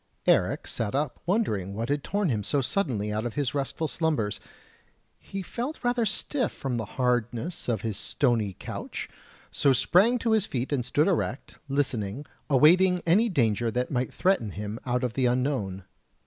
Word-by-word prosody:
Eric - - +3
sat 115 +1 -2
up 145 -3 -1
wondering 105 - 0
what 115 +3 -3
had 145 0 0
torn 200 -2 0
him 110 -5 0
so 145 - +1
suddenly 120 - -1
out 110 +1 -1
of 120 -2 -4
his 140 -1 0
restful 145 +3 -2
slumbers; 150 - -1 0.8
he 195 -1 -6
felt 250 - -5
rather 245 -2 +2
stiff 245 +5 -1
from 130 -3 -3
the 110 - -2
hardness 125 +5 -1
of 110 -5 0
his 110 -3 -2
stony 115 -7 +1
couch, - - -6 0.4
so 140 - +3
sprang 200 - +4
to 230 -1 0
his 220 -2 +3
feet 130 +2 -2
and 130 -3 +1
stood 145 +4 +2
erect, 160 -7 -2
listening, 130 -3 -1 0.2
awaiting 180 +6 +5
any 205 +8 +4
danger 120 - +1
that 125 +3 -2
might 125 -1 -1
threaten 155 - +1
him 105 +2 -5
out 125 +1 0
of 125 -3 -1
the 130 0 +2
unknown. 120 -7 -1
135 Hz, 170 wpm, -27 LUFS, 115-175 Hz, 0.8 s, awaiting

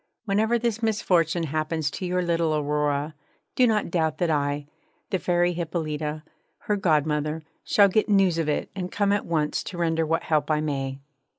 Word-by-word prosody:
Whenever 220 +3 +2
this 230 -1 -1
misfortune 180 -7 +1
happens 155 0 -1
to 185 - -4
your 180 0 0
little 165 -2 +1
Aurora, 150 0 0 0.4
do 250 - +5
not 210 -5 0
doubt 160 -3 0
that 170 -1 +1
I, 145 -1 0 0.5
the 190 - +1
Fairy 175 0 +1
Hippolyta, 155 -3 -3 0.4
her 210 - 0
godmother, 155 -3 0 0.2
shall 200 -1 +5
get 215 +3 +1
news 190 -5 +3
of 155 -2 0
it 150 - -1
and 180 -2 -4
come 205 -1 +1
at 205 - 0
once 155 -3 0
to 180 - -6
render 165 -1 +1
what 165 +1 0
help 150 -2 0
I 155 -1 +2
may.' 135 -3 -3
165 Hz, 175 wpm, -25 LUFS, 150-185 Hz, 0.5 s, do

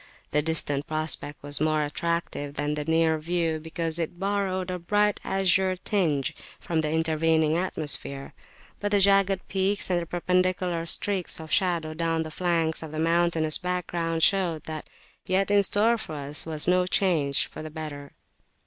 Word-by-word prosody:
The 150 - +2
distant 145 -2 -1
prospect 155 -2 +2
was 145 0 -4
more 155 -1 +2
attractive 150 -2 -3
than 145 +1 -1
the 150 0 -3
near 160 0 +2
view, 165 0 -1
because 160 +1 -3
it 170 +1 -3
borrowed 190 -1 -1
a 180 - -4
bright 205 +4 +1
azure 190 -1 +1
tinge 160 -6 -1 0.2
from 165 -2 -1
the 155 - -2
intervening 160 -1 +2
atmosphere; 145 -6 -3 0.5
but 205 - -1
the 205 0 +3
jagged 195 -1 +3
peaks 195 0 0
and 175 -1 +1
the 170 - -6
perpendicular 180 -1 0
streaks 190 -1 0
of 160 -1 -9
shadow 170 -4 +1
down 165 0 -1
the 155 - -8
flanks 165 -1 0
of 160 -2 -8
the 155 - -6
mountainous 165 -1 +3
background 170 -2 -2
[p.253] - - +10
showed 175 -6 -1
that 155 -1 -7 0.4
yet 195 +2 +1
in 205 0 +5
store 220 +4 +4
for 160 -8 -7
us 145 +2 -3
was 155 -1 +3
no 180 0 +3
change 160 -8 +1
for - - -10
the 155 - -7
better. 150 -2 -8
165 Hz, 165 wpm, -26 LUFS, 155-185 Hz, 0.5 s, p.253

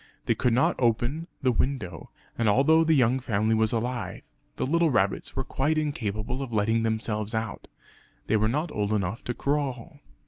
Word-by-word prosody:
They - - +3
could 125 - +1
not 125 - +2
open 120 +7 0 0.2
the 130 - +4
window; 110 - -2 0.3
and 115 -2 +1
although 150 +9 +5
the 160 -1 +3
young 130 -1 +3
family 110 -3 0
was 110 -1 +2
alive 120 0 -3 0.3
the - - -1
little 165 +4 +2
rabbits 100 -7 0
were 135 - -1
quite 150 +5 0
incapable 125 -5 -2
of 135 -3 -5
letting 110 +1 +2
themselves 110 -1 -2
out; 110 -2 -4 0.6
they - - +1
were 110 0 +2
not 150 +6 -1
old 105 0 -1
enough 100 +1 -2
to 120 - -3
crawl. 140 +1 -2
120 Hz, 175 wpm, -27 LUFS, 110-140 Hz, 0.6 s, although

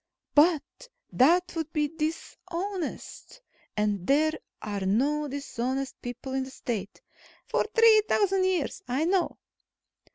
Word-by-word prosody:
"But 305 0 +5 0.5
that 350 +7 +4
would 320 -2 -3
be 300 -2 +1
dishonest. 335 +7 -5 0.4
And 205 -3 0
there 305 +3 +4 0.3
are 210 -2 -4
no 270 +11 +1
dishonest 270 -1 -3
people 245 +2 -6
in 265 0 0
the 260 - -8
State." 225 - -5 0.4
"For - - 0
three 455 -2 +7
thousand 390 -2 +3
years. 365 -6 -1
I 260 +6 0
know." 360 0 +1
300 Hz, 120 wpm, -27 LUFS, 255-355 Hz, 0.5 s, three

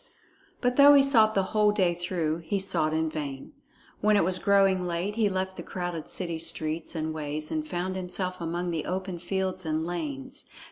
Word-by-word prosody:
But 250 0 +1
though 285 0 +9
he 280 - +7
sought 220 -6 +4
the 195 - +3
whole 210 -1 +4
day 185 -4 +2
through, 170 -2 -2
he 170 +4 -2
sought 190 -5 +1
in 160 0 0
vain. 145 -4 -5 0.5
When 210 0 +4
it - - +4
was 185 +1 +1
growing 195 -2 +3
late, 175 +4 -2
he 220 -3 +2
left 190 0 -3
the - - -5
crowded 175 -3 -5
city 170 -3 -3
streets 160 0 -1
and 160 0 -2
ways 155 0 -5
and 310 -1 -2
found 185 -6 -3
himself 185 0 -3
among 175 +1 -2
the 160 -3 -2
open 185 -1 -3
fields 185 +1 -2
and 160 0 -1
lanes. 155 -6 -5
180 Hz, 190 wpm, -27 LUFS, 160-195 Hz, 0.5 s, though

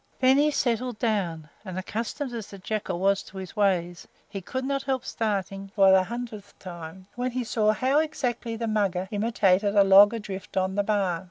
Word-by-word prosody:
Then 260 +1 +5
he 300 +1 +4
settled 250 -4 -1
down, 190 -9 -1 0.2
and, 185 -3 -7
accustomed 235 +7 -4
as 225 -4 -5
the 200 - -11
Jackal 195 -2 -3
was 195 +1 +2
to 195 - -13
his 190 +1 -8
ways, 180 -4 0 0.2
he 200 -1 -6
could 260 +8 -4
not 275 0 -1
help 265 -1 -2
starting, 195 -3 -3
for 195 -2 +6
the 190 0 +6
hundredth 230 -2 -7
time, 175 0 -9
when 250 +1 -2
he 250 0 -3
saw 220 -2 +2
how 260 +6 +2
exactly 250 -7 -2
the 230 +1 -3
Mugger 200 -4 0
imitated 205 -2 +2
a 200 - +7
log 200 +3 +7
adrift 195 -3 -7
on 190 0 +1
the 205 - +1
bar. 200 -4 0
205 Hz, 190 wpm, -26 LUFS, 190-235 Hz, 0.2 s, a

